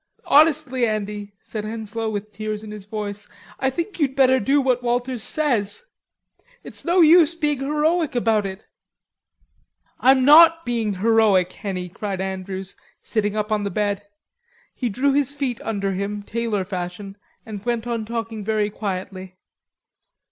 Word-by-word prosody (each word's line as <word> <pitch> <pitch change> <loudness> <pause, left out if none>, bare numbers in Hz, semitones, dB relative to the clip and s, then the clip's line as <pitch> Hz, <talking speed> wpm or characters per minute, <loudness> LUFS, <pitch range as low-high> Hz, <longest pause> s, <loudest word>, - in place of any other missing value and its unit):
"Honestly, 290 -5 +4
Andy," 205 -1 -4
said 215 -2 -6
Henslowe 220 +1 -4
with 210 0 -5
tears 215 +1 -5
in 215 - -8
his 210 -2 -9
voice, 205 -1 -6 0.3
"I 265 - +1
think 340 +8 -4
you'd 270 -4 +1
better 260 -1 +4
do 275 +7 +2
what 255 -2 +1
Walters 245 0 -1
says. 270 - 0 0.8
It's - - -6
no 350 +1 +3
use 330 0 +6
being 295 -4 0
heroic 300 +2 0
about 220 -4 +2
it." 190 +1 -9 1.3
"I'm 260 0 +5
not 330 +3 +7
being 225 -4 -1
heroic, 205 -3 +3
Henny," 185 -3 -5
cried 195 +2 -5
Andrews, 190 0 -5 0.3
sitting 210 -2 -1
up 210 0 -2
on 210 -1 +1
the 200 - -1
bed. 205 +1 -1 0.7
He 245 - -2
drew 270 +6 +1
his 285 0 +1
feet 265 -5 -3
under 200 -3 -2
him, 200 +2 -3
tailor 220 -3 -2
fashion, 185 +1 -6 0.3
and 210 -3 -7
went 235 -1 -1
on 235 -2 -2
talking 225 -1 -4
very 210 0 0
quietly. 185 -2 -5
220 Hz, 150 wpm, -22 LUFS, 205-265 Hz, 1.3 s, not